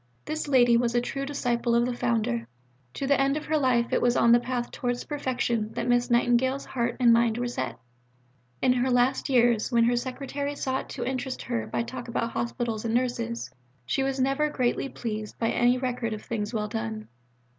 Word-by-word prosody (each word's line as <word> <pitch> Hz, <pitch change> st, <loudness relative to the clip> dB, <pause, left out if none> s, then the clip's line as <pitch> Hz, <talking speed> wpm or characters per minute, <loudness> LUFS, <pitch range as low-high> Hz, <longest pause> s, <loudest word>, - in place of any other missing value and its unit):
'" 120 Hz, -, -39 dB
This 310 Hz, 0 st, -3 dB
lady 245 Hz, -4 st, +5 dB
was 235 Hz, 0 st, 0 dB
a -, -, +5 dB
true 275 Hz, +3 st, -4 dB
disciple 240 Hz, -4 st, 0 dB
of 235 Hz, 0 st, +3 dB
the 250 Hz, -, -1 dB
Founder. 215 Hz, -, -1 dB, 0.5 s
To 275 Hz, -, -3 dB
the 275 Hz, 0 st, +3 dB
end 275 Hz, +2 st, +2 dB
of 305 Hz, -, -5 dB
her 310 Hz, +1 st, +1 dB
life 245 Hz, -3 st, +2 dB
it -, -, +2 dB
was 245 Hz, 0 st, +3 dB
on 235 Hz, -, +5 dB
the 240 Hz, -, +7 dB
path 245 Hz, 0 st, -3 dB
towards 245 Hz, -1 st, -2 dB
perfection 245 Hz, -6 st, -2 dB
that -, -, -3 dB
Miss 245 Hz, 0 st, +2 dB
Nightingale's 245 Hz, +3 st, +2 dB
heart 235 Hz, -1 st, -2 dB
and 240 Hz, -2 st, +6 dB
mind 230 Hz, -1 st, +3 dB
were 245 Hz, 0 st, -1 dB
set. 240 Hz, -, -4 dB, 0.9 s
In 250 Hz, -, +5 dB
her 250 Hz, +1 st, +1 dB
last 250 Hz, +3 st, +2 dB
years, 240 Hz, -3 st, +3 dB
when 235 Hz, -1 st, +4 dB
her 240 Hz, +1 st, +3 dB
secretary 275 Hz, +3 st, -3 dB
sought 265 Hz, -1 st, -2 dB
to 240 Hz, -, -4 dB
interest 260 Hz, 0 st, -3 dB
her 235 Hz, -1 st, -2 dB
by -, -, -1 dB
talk 250 Hz, +1 st, -7 dB
about 235 Hz, 0 st, -2 dB
hospitals 235 Hz, -2 st, -2 dB
and 230 Hz, 0 st, -1 dB
nurses, 240 Hz, -2 st, -2 dB, 0.3 s
she 270 Hz, -, 0 dB
was 270 Hz, 0 st, -1 dB
never 275 Hz, +3 st, +2 dB
greatly 255 Hz, -1 st, 0 dB
pleased 215 Hz, -4 st, -5 dB
by 225 Hz, -, 0 dB
any 245 Hz, +1 st, +3 dB
record 245 Hz, -3 st, -2 dB
of 215 Hz, -, -7 dB
things 210 Hz, -2 st, -3 dB
well 215 Hz, -3 st, -2 dB
done. 110 Hz, -, -4 dB
245 Hz, 205 wpm, -27 LUFS, 235-260 Hz, 0.9 s, the